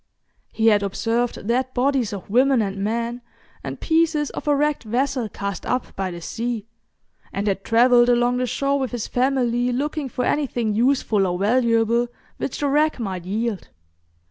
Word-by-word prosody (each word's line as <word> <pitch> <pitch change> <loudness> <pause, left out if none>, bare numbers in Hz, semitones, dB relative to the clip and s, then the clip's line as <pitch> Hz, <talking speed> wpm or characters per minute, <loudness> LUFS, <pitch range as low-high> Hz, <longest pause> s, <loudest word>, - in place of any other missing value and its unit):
He 225 0 +3
had 205 -2 +4
observed 225 +4 -1
dead 255 +3 0
bodies 260 -3 +1
of 200 -3 -7
women 255 +4 +3
and 200 -2 -1
men, 230 +4 -2 0.4
and - - -6
pieces 320 -3 +1
of - - -7
a 295 - +4
wrecked 295 +1 +1
vessel 245 +1 -1
cast 200 -2 -5
up 250 0 -2
by 190 -1 -2
the 175 -1 -7
sea, 230 +3 -3 0.7
and 200 - -3
had 195 -1 -1
travelled 240 +1 +5
along 245 0 +3
the 250 0 0
shore 280 +3 0
with 260 -3 -3
his 240 -3 -2
family, 250 -1 +1
looking 285 +2 -2
for 250 0 -2
anything 245 -7 0
useful 225 -4 +2
or 180 0 -1
valuable 230 +2 +2 0.3
which 270 - -4
the 290 - +1
wreck 300 +1 +2
might 190 -6 -4
yield. 215 +1 -2
240 Hz, 170 wpm, -22 LUFS, 215-265 Hz, 0.7 s, travelled